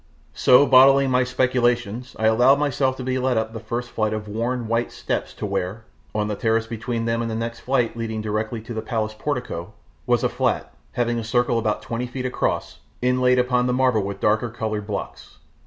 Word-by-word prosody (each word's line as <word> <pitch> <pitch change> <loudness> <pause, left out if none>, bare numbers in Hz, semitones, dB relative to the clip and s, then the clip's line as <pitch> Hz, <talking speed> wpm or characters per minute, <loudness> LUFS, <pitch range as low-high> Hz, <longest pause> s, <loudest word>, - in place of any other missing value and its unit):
So, 130 +3 +6
bottling 135 +1 +6
my 125 0 +3
speculations, 125 -2 0
I 110 - -1
allowed 125 +5 +5
myself 135 -2 0
to 130 - -5
be 130 0 -1
led 130 -2 +1
up 110 0 -1
the 115 - -5
first 120 +2 -4
flight 110 -1 0
of 105 -1 -4
worn, 115 +3 -2
white 115 +1 0
steps - - -3
to - - -5
where, 100 +2 -3 0.3
on 105 0 0
the 105 - -2
terrace 110 +2 +1
between 115 +1 -3
them 115 0 0
and 115 - -2
the 110 - -3
next 115 +1 -4
flight 125 -3 0
leading 115 -1 -3
directly 110 +1 -2
to 115 +2 -8
the 110 - -3
palace 110 -3 -2
portico, 110 - -4 0.3
was 120 -2 +2
a - - +2
flat, - - -1 0.2
having 120 -1 0
a - - -4
circle 120 +1 +1
about 110 -2 -1
twenty 120 +2 -3
feet 125 +1 -5
across, 125 - -2 0.2
inlaid 125 0 +3
upon 125 0 +2
the 125 - +1
marble 125 -4 +2
with 100 0 -5
darker 110 +4 +1
coloured 110 -3 -4
blocks. 105 - -6
115 Hz, 205 wpm, -23 LUFS, 110-125 Hz, 0.3 s, So